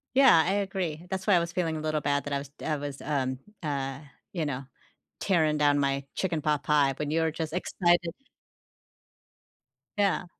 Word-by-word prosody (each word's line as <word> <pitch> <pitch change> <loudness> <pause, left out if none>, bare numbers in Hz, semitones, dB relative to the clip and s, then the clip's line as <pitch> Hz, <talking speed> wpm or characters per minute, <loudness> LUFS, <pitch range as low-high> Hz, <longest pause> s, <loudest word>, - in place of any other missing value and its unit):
Yeah, 250 -13 +7
I 185 - +1
agree, 180 -4 -3
that's 190 0 -3
why 205 - +4
I 175 - +6
was 170 0 -2
feeling 170 -3 -1
a 155 - -3
little 155 -1 0
bad 145 0 0
that 145 - -3
I 140 - +2
was 140 0 -7
d 145 - -11
I 155 - +1
was, 145 -1 -6
um, 130 -3 -1 0.2
uh, 135 -2 -2 0.3
you 165 -5 -2
know, 135 -1 -3 0.6
tearing 155 -5 +2
down 145 -1 +3
my 140 0 0
chicken 170 -4 0
pot 150 -1 +1
pie 145 -2 +3
when 150 -1 -2
you 165 +1 +2
were 160 -1 +1
just 160 -1 -4
excited. 175 -1 +1 1.9
Yeah. 200 -3 +2
155 Hz, 190 wpm, -28 LUFS, 145-175 Hz, 1.9 s, Yeah